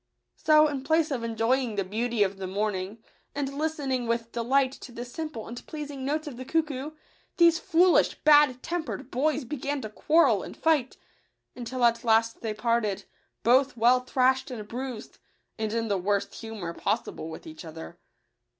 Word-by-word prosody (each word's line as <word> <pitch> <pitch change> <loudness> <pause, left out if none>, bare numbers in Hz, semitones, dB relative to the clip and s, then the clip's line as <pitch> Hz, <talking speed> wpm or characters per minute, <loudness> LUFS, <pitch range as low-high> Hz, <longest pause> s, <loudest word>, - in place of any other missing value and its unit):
So, 305 0 +5
in 285 -3 -3
place 315 +1 +2
of 250 -4 -2
enjoying 230 +1 0
the 200 - 0
beauty 220 +3 0
of 195 0 -2
the 190 -1 -5
morning, 205 +2 -3 0.3
and 280 -1 -3
listening 280 -5 -1
with 230 0 -1
delight 260 +3 +2
to 265 - -11
the 240 +1 -6
simple 295 -2 -6
and 240 +1 -8
pleasing 290 -3 -6
notes 305 +4 -1
of 280 -5 -7
the 255 - -6
cuckoo, 300 0 -2 0.4
these 340 -1 +5
foolish, 350 +2 +4
bad 295 -4 +5
tempered 315 -6 -4
boys 290 +2 0
began 285 +2 -3
to 215 - -6
quarrel 320 +9 +3
and - - -9
fight, 300 -6 +1 0.6
until 245 0 -1
at 235 0 +2
last 225 0 +2
they 225 - -2
parted, 225 -3 0 0.4
both 260 +2 +3
well 240 +3 +5
thrashed 260 +1 +1
and 220 -5 -7
bruised, 245 -1 -6 0.4
and 220 -1 -1
in 230 0 -1
the 200 -3 0
worst 200 +2 -1
humour 215 -7 -6
possible 160 - -2
with 160 - -9
each 160 +2 -10
other. 165 +1 -10
245 Hz, 170 wpm, -27 LUFS, 225-290 Hz, 0.6 s, So